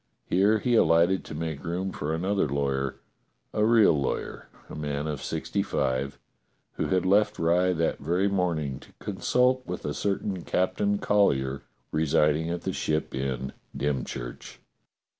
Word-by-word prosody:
Here 100 +4 +3
he 120 +3 0
alighted 85 -3 +4
to - - -7
make 80 -2 -4
room 90 +3 -2
for 75 -3 -3
another 90 0 0
lawyer, 70 -1 -1 0.6
a 105 - +1
real 110 -1 +6
lawyer, 70 -3 -3 0.2
a - - -10
man 75 -1 -3
of 75 -3 -3
sixty - - -2
five, 65 +2 -1 0.6
who - - -2
had 95 -1 +1
left 100 +3 +3
Rye 90 +2 +3
that 85 -1 0
Very 90 +7 +1
morning 85 -8 -1
to - - -17
consult 125 +6 +1
with 90 - -5
a 75 - -1
certain 100 -1 -2
Captain 205 - 0
Collyer 70 - +2 0.3
residing 75 +1 +2
at 85 0 -3
the - - -2
Ship 75 0 -1
Inn, 65 0 -3 0.2
Dymchurch. 65 -4 -4
85 Hz, 145 wpm, -27 LUFS, 70-95 Hz, 0.6 s, real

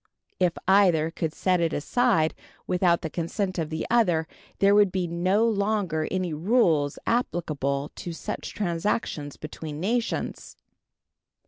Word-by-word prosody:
If 180 -2 +3
either 180 -5 +4
could 160 -1 -2
set 180 +3 +1
it 165 -1 +1
aside 190 0 +2 0.3
without 180 -1 +2
the 160 - -2
consent 185 +2 -2
of 160 -2 -2
the 160 0 -3
other, 175 -9 +3 0.3
there 200 0 +4
would 205 -2 +5
be 185 -1 -1
no 185 +6 +1
longer 200 -7 0
any 185 -3 -2
rules 160 - +2
applicable 145 - -1
to 175 - -5
such 190 +6 -5
transactions 170 -5 -2
between 155 -1 -7
nations. 230 +6 -2
175 Hz, 130 wpm, -26 LUFS, 160-200 Hz, 0.3 s, would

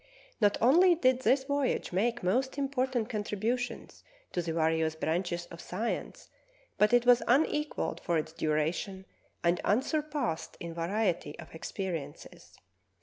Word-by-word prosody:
Not 205 -1 +4
only 345 +9 +6
did 260 -5 +2
this 265 +1 +3
vo3'age 280 -8 -1
make 235 +5 0
most 255 +10 0
important 260 -4 0
contributions 225 +2 -3 0.3
to 175 - -1
the 165 -1 -3
various 160 -1 +1
branches 175 +2 -1
of 170 - -9
science, 215 +6 -4 0.5
but 210 0 +5
it 245 0 +4
was 245 0 +6
unequalled 300 +3 +1
for 170 -2 +1
its 155 +1 -3
duration 165 +5 -1 0.4
and 175 +1 +2
unsurpassed 280 - -1
in 170 -1 -6
variety 170 -2 -1
of 165 - -11
experiences. 165 -3 -6
210 Hz, 130 wpm, -30 LUFS, 170-255 Hz, 0.5 s, only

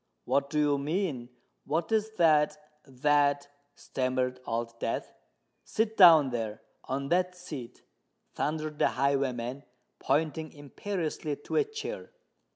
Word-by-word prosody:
"What 140 +2 +1
do 150 - -2
you 145 -1 +3
mean?—what 150 - -3
is 220 -1 +2
that—that——" 150 -2 +2 0.3
stammered 130 -1 -2
Old 115 0 -3
Death. 115 - -3 0.5
"Sit 220 0 -1
down—there—on 135 - +3
that 180 +1 +1
seat!" 150 -9 -9 0.5
thundered 155 0 -3
the - - +5
highwayman, 135 -2 0 0.4
pointing 155 +2 0
imperiously 155 +1 -4
to 145 - -7
a 450 - +5
chair. 440 +4 -7
145 Hz, 100 wpm, -29 LUFS, 130-160 Hz, 0.5 s, the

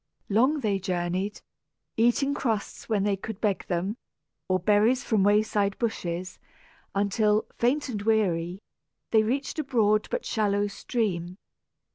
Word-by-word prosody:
Long 260 +9 +3
they 205 -4 0
journeyed, 185 +2 -2 0.5
eating 240 +5 +2
crusts 225 -7 -3
when 210 -3 +1
they 205 -1 +2
could 200 +1 -7
beg 205 -4 -1
them, 185 +6 -1 0.5
or 185 - +3
berries 215 +7 +3
from 220 -3 +1
wayside 205 0 +2
bushes, 180 -6 -3 0.6
until, 210 +1 +2
faint 275 +6 +2
and 215 -6 -4
weary, 190 -4 0 0.5
they 220 - +5
reached 270 +7 -2
a - - 0
broad 215 -5 +2
but - - -3
shallow 205 -2 +1
stream. 190 -4 -2
210 Hz, 130 wpm, -27 LUFS, 195-230 Hz, 0.6 s, they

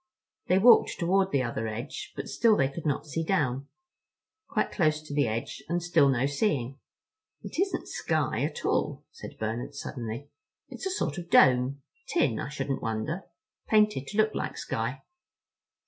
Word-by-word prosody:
They 185 - +4
walked 235 +5 +6
toward 190 +2 +2
the 135 -2 +2
other 115 -2 -2
edge, 120 +7 -6
and - - -4
still 225 -2 +3
they 135 -1 +2
could 155 +3 -5
not 145 - -1
see 160 +2 -2
down; 140 -7 0 0.8
quite - - 0
close 155 -5 +2
to 150 - -8
the 145 -3 +2
edge, 115 +5 -4
and 175 +1 +1
still 170 -5 +4
no 130 -1 +2
seeing. 140 - -1 0.6
"It - - -6
isn't 390 +1 0
sky 150 -7 -1
at 150 +2 -3
all," - - 0
said - - -10
Bernard 110 +2 -3
suddenly. 120 +2 -6 0.4
"It's - - -5
a - - -1
sort 175 - -2
of 175 -1 -9
dome—tin 130 -3 +2
I - - -4
shouldn't 135 -2 -3
wonder, 115 - -3 0.4
painted 210 -10 +3
to 210 - -6
look 215 0 +3
like - - -3
sky." - - -3
145 Hz, 160 wpm, -28 LUFS, 130-175 Hz, 0.8 s, walked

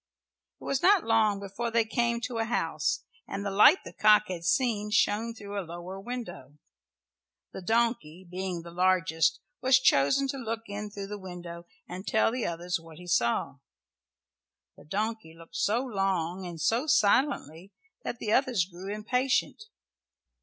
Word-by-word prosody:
It - - -15
was 275 - -1
not 390 -1 +5
long 220 -3 +2
before 200 +4 -4
they 230 0 +2
came 235 +1 0
to 235 0 -3
a 225 - +1
house 160 -9 -1 0.2
and 200 +1 -5
the 200 - -1
light 240 - +6
the - - -9
cock 210 -1 +5
had 175 -2 -5
seen 210 +2 +1
shone 220 +2 +1
through 205 -2 -6
a - - -1
lower 175 +2 -8
window. 195 - -7 1.0
The - - -7
donkey, 190 -5 0
being 180 -1 -4
the 170 - -10
largest, 180 +2 +2 0.2
was 260 +1 +5
chosen 260 - +3
to 275 - -3
look 230 -2 -3
in 205 0 -5
through 200 -1 -6
the 205 +1 -7
window 175 -2 -9 0.2
and 185 +2 -8
tell 220 0 +3
the 250 0 -2
others 175 +1 -2
what 165 -1 -14
he 180 - -11
saw. 120 -4 0 1.2
The - - -17
donkey 210 -1 -3
looked 165 0 -10
so 230 +5 +1
long 190 -5 -1
and 170 -2 -8
so 235 - +1
silently 200 - +2 0.3
that - - -4
the 215 -2 -1
others 250 -9 +2
grew 185 +2 -8
impatient. 250 - 0
200 Hz, 160 wpm, -28 LUFS, 175-230 Hz, 1.2 s, light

